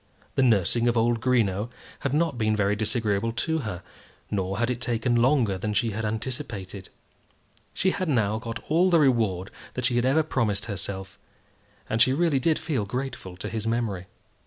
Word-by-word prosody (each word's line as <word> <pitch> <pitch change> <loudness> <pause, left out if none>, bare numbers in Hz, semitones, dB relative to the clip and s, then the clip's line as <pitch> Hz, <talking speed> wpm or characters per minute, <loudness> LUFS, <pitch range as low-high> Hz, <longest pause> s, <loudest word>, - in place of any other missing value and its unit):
The - - +1
nursing 115 -1 +3
of 120 0 +2
old 115 0 +2
Greenow 115 -4 +1 0.3
had 140 - -2
not 155 0 +1
been 110 -2 +1
very 105 -1 +2
disagreeable 110 0 0
to 160 +7 0
her, 95 - -5 0.5
nor 95 -1 -1
had 120 +2 +1
it 120 -1 -4
taken 120 0 0
longer 120 -5 +3
than 105 +2 -2
she 115 +2 +2
had 110 +2 -3
anticipated. 105 -4 -4 0.8
She 190 - +1
had 185 -3 -2
now 110 -5 +1
got 115 0 -5
all 170 +4 +4
the 170 - +5
reward 110 - +2 0.2
that 125 - -2
she 125 -1 +2
had 120 - +2
ever 155 +4 +3
promised 110 -9 0
herself, 95 -2 -5 0.7
and 110 +1 0
she 130 +2 +6
really 155 -2 +2
did 155 +4 +2
feel 125 -11 -2
grateful 125 -6 -5
to - - -5
his 110 0 -3
memory. 110 -6 -1
115 Hz, 180 wpm, -26 LUFS, 105-130 Hz, 0.8 s, she